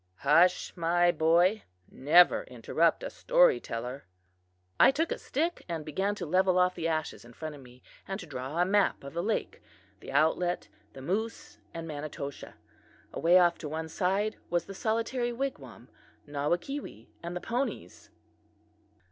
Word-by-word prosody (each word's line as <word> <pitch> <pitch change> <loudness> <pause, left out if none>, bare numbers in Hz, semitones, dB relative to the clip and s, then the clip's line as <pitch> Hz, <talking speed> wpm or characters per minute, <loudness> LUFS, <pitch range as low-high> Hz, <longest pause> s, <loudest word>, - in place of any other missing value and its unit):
"Hush, 170 +5 +4
my 175 0 +3
boy; 175 +6 +3 0.3
never 170 - +5
interrupt - - 0
a - - -5
storyteller." 360 - +1 0.7
I - - +8
took 320 +5 0
a - - -2
stick 330 +6 -2
and 160 -3 -4
began 190 +7 -1
to 185 - -5
level 185 +3 +2
off 180 0 +3
the 165 - -3
ashes 155 -2 -3
in 120 0 -15
front 155 +4 -6
of 145 - -12
me, 125 0 -17 0.2
and 195 +1 -4
to 180 - -8
draw 135 +1 -6
a 175 - +4
map 200 -3 +1
of 140 - -9
the 170 - -2
lake, 215 +4 -2 0.4
the - - -9
outlet, 160 +5 +1 0.3
the 135 - -10
moose 225 - -4
and 165 0 -7
Manitoshaw. 145 -2 -6 0.6
Away 175 +2 +4
off 175 -1 +4
to 150 - -6
one 160 +1 -4
side 195 +5 0
was 175 -1 0
the 195 - -8
solitary 230 +4 -1
wigwam, 270 +3 -5 0.4
Nawakewee 150 - -3 0.2
and 170 +1 -6
the - - -2
ponies. 245 +7 -4
175 Hz, 155 wpm, -29 LUFS, 155-205 Hz, 0.7 s, I